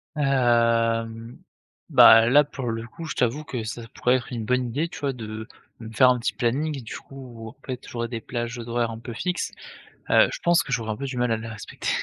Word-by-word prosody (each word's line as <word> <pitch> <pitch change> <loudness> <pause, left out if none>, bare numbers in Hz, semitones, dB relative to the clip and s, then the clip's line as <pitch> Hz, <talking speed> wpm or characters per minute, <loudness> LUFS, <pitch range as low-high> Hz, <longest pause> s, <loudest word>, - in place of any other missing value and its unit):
Hem, 115 -4 +1 0.5
bah 115 0 +8
là, 145 +5 +6
pour 135 -4 -5
le 115 0 -4
coup, 165 +7 -9
je 155 - -5
t'avoue 125 +5 0
que 125 -6 -5
ça 115 +2 -6
pourrait 125 +1 +2
être 130 0 -3
une 115 -3 -4
bonne 125 +1 +1
idée 145 +8 -1
tu - - -9
vois? 140 -2 0
De 110 -2 -7 0.3
me 115 -1 -9
faire 130 +4 +6
un 125 - +3
petit 115 - -1
planning, 140 +4 -1
du 110 - -7
coup, 125 -4 -11
en 115 - -15
fait, 125 -2 -6
où - - -10
j'aurais 115 -1 -3
des 115 -1 -5
plages 120 +1 -4
d'horaires 120 0 -1
un 110 - -7
peu 120 0 -7
fixes, 180 +9 -2 0.6
heu, - - +6
je - - -5
pense 175 0 +4
que - - -8
j'aurais 115 -3 -1
un - - -2
peu 140 - -7
du 130 -2 -5
mal 120 -1 +1
à - - 0
les 110 +1 -7
respecter 110 -3 -6
120 Hz, 235 wpm, -24 LUFS, 115-130 Hz, 0.6 s, bah